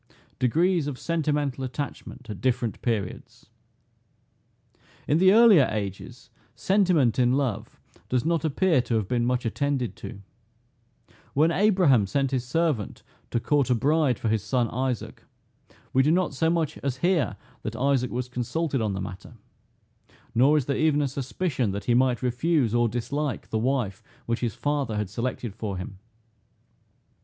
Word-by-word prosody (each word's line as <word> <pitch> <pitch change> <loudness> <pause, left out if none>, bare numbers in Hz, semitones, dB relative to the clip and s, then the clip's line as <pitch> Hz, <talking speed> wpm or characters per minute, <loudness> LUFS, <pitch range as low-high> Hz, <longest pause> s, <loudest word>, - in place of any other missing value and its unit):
DEGREES 165 +5 +2
OF 140 -3 -4
SENTIMENTAL 150 -5 -1
ATTACHMENT 130 -1 -6
AT 105 -4 -7
DIFFERENT 125 -5 -1
PERIODS. 105 -6 -4 1.6
In 150 - +3
the 185 +1 +6
earlier 215 - +7
ages, 100 -3 -6 0.2
sentiment 180 - +2
in 125 0 +3
love 130 -7 -2 0.3
does 125 +2 0
not 165 -2 +1
appear 160 -1 +2
to 120 - -2
have 110 -4 0
been 120 +1 0
much 125 0 0
attended 135 +1 -1
to. 100 0 -9 1.1
When 155 +4 +4
Abraham 170 - +3
sent 135 +6 0
his 130 -3 0
servant 130 - -1 0.3
to 120 - 0
court 140 +2 +1
a 125 - +4
bride 140 0 +2
for - - -3
his 110 -1 +1
son 120 +1 0
Isaac, 130 -1 -3 0.7
we 130 - +5
do 140 - +2
not 175 -1 +2
so 160 +4 +1
much 165 -3 -1
as 135 -2 -3
hear 165 - +1 0.3
that 110 +1 -5
Isaac 130 0 +1
was 125 +1 -3
consulted 135 +3 -2
on 105 -2 -1
the 95 - -3
matter: 90 0 -8 1.0
nor 135 +6 +4
is 145 - 0
there 140 - -1
even 150 -2 +2
a - - +1
suspicion, 135 - -2
that 100 - -5
he 120 - +2
might 125 0 +2
refuse 125 0 +1
or 120 -1 +3
dislike 130 +4 -3
the 110 - 0
wife 120 -5 -1 0.2
which 115 0 -1
his 115 -4 -2
father 145 -7 -1
had 105 -3 -3
selected 120 -1 -3
for 105 -3 -4
him. 95 +1 -7
130 Hz, 155 wpm, -26 LUFS, 115-150 Hz, 1.6 s, earlier